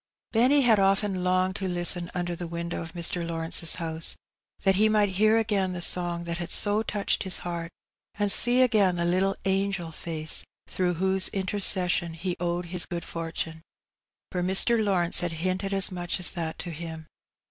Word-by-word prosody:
Benny 255 +5 +4
had 230 -5 +4
often 195 -1 +1
longed 185 +1 +1
to 190 - -3
listen 175 0 +1
under 175 -1 -2
the 175 0 -6
window 170 +1 -5
of 165 -1 -9
Mr. 170 0 -1
Lawrence's 165 0 -1
house, 165 -1 0 0.5
that 195 - +4
he 215 +3 +3
might 210 -1 +2
hear 215 +4 +3
again 205 -4 0
the 180 - -5
song 175 -1 -1
that 170 0 -4
had 170 -1 -5
so 205 +3 +2
touched 210 -2 -1
his 190 -2 -1
heart, 170 -1 -4 0.5
and 205 -1 +1
see 245 +4 +6
again 210 -7 +2
the 170 0 -1
little 185 +3 +1
angel 195 -3 -1
face 160 -1 -4 0.2
through 180 -1 -1
whose 190 +2 +1
intercession 185 -3 +1
he 175 +2 -3
owed 175 0 -2
his 180 - 0
good 170 -2 -5
fortune; 165 -1 -5 0.7
for 180 - -2
Mr. 195 +5 +3
Lawrence 180 -4 +2
had 175 -2 0
hinted 185 +4 -2
as 195 -1 +4
much 175 0 -2
as 180 - +5
that 165 -3 -4
to 175 - -6
him. 160 0 -8
180 Hz, 180 wpm, -26 LUFS, 170-195 Hz, 0.7 s, see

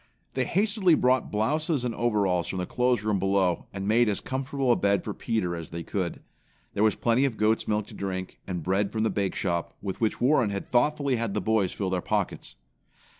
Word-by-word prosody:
They 130 -1 0
hastily 200 - +3
brought 130 -2 +2
blouses 145 +6 0
and 120 - -1
overalls 100 -7 +1
from 95 - -4
the 90 - -1
clothes 125 +2 +1
room 105 -2 +1
below 95 -2 +1
and 95 0 -5
made 115 +1 +4
as 100 - 0
comfortable 135 0 -1
a - - +5
bed 100 0 +1
for 105 - -4
Peter 100 -7 -1
as 85 -1 -7
they 85 0 -6
could. 90 -2 -3 0.5
There - - -1
was 110 - +3
plenty 120 +3 +2
of 130 -6 0
goat's 110 +1 +1
milk 105 -1 0
to - - -13
drink, 95 -1 -5
and 90 -4 -3
bread 95 +3 0
from 110 0 -1
the 110 - +1
bake 100 -3 -1
shop, 85 -3 -2
with 95 +1 -5
which 110 -2 0
Warren 125 -3 +3
had 100 -1 -4
thoughtfully 140 +1 +1
had 115 -3 -2
the - - +1
boys 110 -4 +1
fill 95 -2 -3
their 90 -1 0
pockets. - - -2
105 Hz, 215 wpm, -27 LUFS, 95-125 Hz, 0.5 s, a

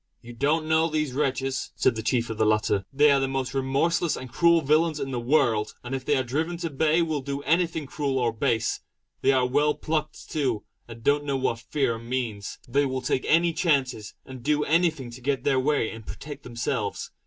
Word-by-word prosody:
"You 120 0 -10
don't 150 +6 +1
know 160 +1 +3
these 155 -4 -1
wretches," 135 -1 -1
said - - +3
the 110 - -4
chief 115 0 0
of 110 - -6
the - - +4
latter 105 -2 +2
"They 145 +2 +5
are 140 - +4
the 135 - 0
most 135 -1 -2
remorseless 140 +5 +1
and 130 -2 -9
cruel 170 -1 +4
villains 155 +2 +2
in 135 -1 -3
the 125 - -2
world; 120 -4 +1
and 125 +1 -6
if 135 -1 -3
they 145 +1 +2
are 130 - +1
driven 160 +7 -2
to 165 -2 -4
bay 160 +4 +2
will 155 -3 -2
do 140 +1 -4
anything 165 +1 +1
however 145 +5 -13
cruel 140 -4 0
or 120 -3 +1
base. 115 0 0 0.4
They 135 - +4
are 130 -2 +3
well 145 +3 +2
plucked 155 0 -3
too, 130 -8 -1 0.2
and 115 -1 -11
don't 145 +2 +3
know 140 -1 0
what 125 -3 -1
fear 120 0 -1
means. 115 -4 -4
They 140 +3 +2
will 130 0 -3
take 130 - 0
any 170 +1 +4
chances, 135 - 0
and 130 -1 -9
do 150 +3 +1
anything 160 -6 +1
to 125 +2 -11
get 135 0 -1
their 135 -2 +2
way 140 -3 +1
and 110 0 -9
protect 145 +6 -8
themselves. 120 -1 -3
135 Hz, 215 wpm, -26 LUFS, 125-155 Hz, 0.4 s, They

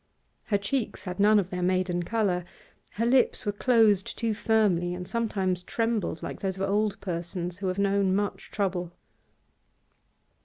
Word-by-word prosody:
Her 205 - +2
cheeks 215 +5 -2
had 180 0 -6
none 210 +1 +6
of 190 -3 0
their 180 -1 -3
maiden 180 -1 +1
colour. 190 -2 0 0.5
Her 230 - -1
lips 250 0 +3
were 205 - +1
closed 210 -3 +3
too 230 -2 0
firmly, 205 -6 +1
and 180 0 -6
sometimes 195 -6 -1
trembled 225 -3 -2
like - - -5
those 190 -1 -2
of 195 +1 -1
old 205 0 0
persons 175 0 -4
who 195 - -2
have 185 +1 -1
known 200 -1 +2
much 205 0 -2
trouble. 180 -4 -2
195 Hz, 155 wpm, -27 LUFS, 180-215 Hz, 0.5 s, none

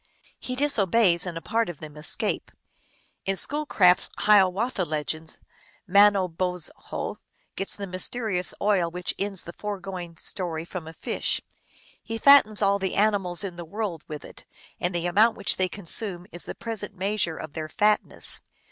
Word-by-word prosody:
He 255 - -4
disobeys, 215 - +3
and 170 -2 -4
a 165 - -7
part 230 +2 0
of 170 - -7
them 155 -1 -10
escape. 150 0 0 0.8
In 195 0 0
Schoolcraft 215 -12 +3
s - - +3
Hiawatha 205 +1 +3
Legends, 155 0 -3 0.5
Mano 200 0 +5
bozho 180 0 -3 0.4
gets 195 - 0
the 200 - -5
mysterious 185 0 0
oil 195 -5 +2
which 180 +1 -1
ends 195 -2 -1
the 170 - -9
fore 205 +1 -5
going 180 -3 -7
story 165 -2 -4
from 175 -2 -7
a 160 - -8
fish. - - -2 0.6
He 225 0 -5
fattens 225 -5 +6
all 200 0 +3
the 190 -2 -2
animals 200 -3 +1
in 180 -3 -6
the 175 - -6
world 180 -2 -4
with 150 -1 -7
it, - - -11 0.4
and 175 0 -1
the 170 0 -1
amount 215 +6 +4
which 200 - +1
they 185 -1 +1
con 200 0 -9
sume 180 -1 -2
is 175 - -5
the - - -6
present 220 -3 -5
measure 190 -3 0
of 155 - -8
their 155 -1 -5
fatness. 210 +5 +1
185 Hz, 165 wpm, -26 LUFS, 170-210 Hz, 0.8 s, fattens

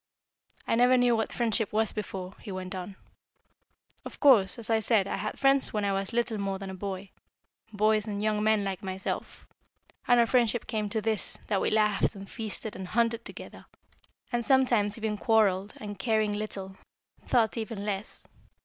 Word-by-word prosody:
"I - - +1
never 245 +2 +5
knew 245 -1 +4
what 220 -1 -1
friendship 225 -2 +1
was 220 0 +1
before," 190 -3 -5
he 205 - -8
went 185 -1 -5
on. 185 +1 -6 1.1
"Of - - -10
course, 245 -10 +5
as 235 - -4
I 225 -1 +2
said, 220 -2 +2
I - - -2
had 210 +2 -4
friends 275 0 +4
when 210 -1 0
I 200 - +1
was 195 +1 -2
little 235 -2 -1
more 195 -1 -2
than 195 0 -7
a - - -7
boy, 190 0 -6 0.6
boys 215 0 +2
and 205 -1 -3
young 215 -1 +1
men 215 -1 +3
like 195 -2 -3
myself, 190 0 -5 0.6
and 245 -1 +5
our 235 - +6
friendship 235 -1 +2
came 215 -2 -2
to 220 +1 -1
this, 220 -1 -1
that 200 -3 0
we - - +1
laughed, 210 -2 +2
and 195 0 -9
feasted 220 0 -5
and 190 -1 -6
hunted 230 +2 +1
together, - - -9 0.6
and 240 -1 0
sometimes 235 -6 +3
even 220 -2 -2
quarrelled, 205 -3 +2
and 205 -2 -7
caring 215 0 +1
little, 195 -2 -5 0.5
thought 225 -3 +2
even 220 -3 -4
less. 205 +1 -4
215 Hz, 180 wpm, -28 LUFS, 195-225 Hz, 1.1 s, our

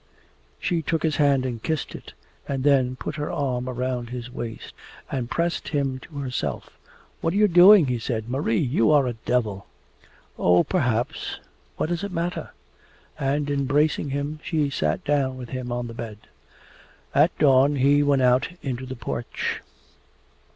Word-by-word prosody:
She 170 -2 0
took 160 +1 -1
his 155 -3 +1
hand 140 -3 +3
and 120 -3 -4
kissed 160 +2 -2
it, - - -10 0.3
and 135 -2 -2
then 130 -3 +3
put 150 +4 -5
her 150 0 -3
arm 130 -2 -2
round 125 -1 -3
his 125 0 -6
waist 120 -3 -7 0.4
and 125 -3 -2
pressed 170 0 -1
him 135 -3 -1
to 145 +2 -12
herself. 125 - -3 0.5
'What 165 - 0
are - - 0
you 210 0 +5
doing?' 180 0 +8
he 125 -2 -1
said. 110 -2 -3
'Marie, 125 -3 0
you 120 -1 +2
are 145 -3 +5
a 125 - -1
devil!' 110 -4 -2 0.7
'Oh, 90 0 +5
perhaps. 125 -10 -1 0.4
What - - -1
does 175 +1 -2
it 200 - -4
matter?' 175 0 -3 0.7
And 140 +2 0
embracing 145 +2 +1
him 145 +2 -3
she 150 -4 0
sat 75 - -1
down 135 -3 +1
with 125 -2 -8
him 130 -1 -5
on 120 0 -2
the 115 - -7
bed. 115 -2 -7 1.0
At 150 +5 +3
dawn 140 0 +5
he 140 +2 +4
went 140 -2 +3
out 125 +1 +3
into 130 -1 -4
the 130 - -6
porch. 120 0 -4
135 Hz, 165 wpm, -24 LUFS, 125-150 Hz, 1.0 s, doing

